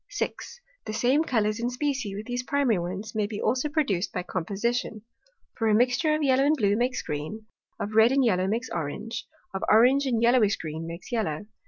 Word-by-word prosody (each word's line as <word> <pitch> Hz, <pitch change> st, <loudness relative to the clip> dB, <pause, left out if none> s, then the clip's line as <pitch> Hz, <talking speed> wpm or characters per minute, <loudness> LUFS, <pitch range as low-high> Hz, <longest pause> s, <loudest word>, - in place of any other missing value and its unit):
6. 485 Hz, -1 st, -4 dB, 0.3 s
The 215 Hz, -, -3 dB
same 260 Hz, +7 st, +2 dB
Colours 215 Hz, -7 st, 0 dB
in 240 Hz, +1 st, -1 dB
Specie 250 Hz, -5 st, -2 dB
with 210 Hz, +2 st, -6 dB
these 245 Hz, +1 st, -2 dB
primary 265 Hz, -6 st, +1 dB
Ones, 190 Hz, +5 st, -5 dB
may 210 Hz, -1 st, 0 dB
be 205 Hz, -1 st, -5 dB
also 255 Hz, +6 st, 0 dB
produced 240 Hz, -, 0 dB
by 180 Hz, -, -3 dB
Composition: 210 Hz, +5 st, -2 dB, 0.5 s
For, 225 Hz, -, 0 dB
a 215 Hz, -, +4 dB
mixture 250 Hz, +7 st, +2 dB
of 305 Hz, -, -1 dB
Yellow 265 Hz, -1 st, +3 dB
and 295 Hz, +2 st, +3 dB
Blue 205 Hz, -4 st, +2 dB
makes 245 Hz, +3 st, 0 dB
Green; 155 Hz, +9 st, -5 dB, 0.3 s
of 210 Hz, -, -4 dB
Red 220 Hz, +2 st, +6 dB
and 270 Hz, -1 st, +3 dB
Yellow, 185 Hz, -4 st, +2 dB
makes 230 Hz, +5 st, -2 dB
Orange; 170 Hz, +8 st, -4 dB, 0.3 s
of 190 Hz, -, -3 dB
Orange 255 Hz, +6 st, +5 dB
and 235 Hz, -3 st, +1 dB
Yellowish 235 Hz, -3 st, +4 dB
Green, 160 Hz, +1 st, -6 dB
makes 170 Hz, +6 st, -8 dB
Yellow. 210 Hz, -7 st, -2 dB
225 Hz, 195 wpm, -26 LUFS, 200-255 Hz, 0.5 s, Red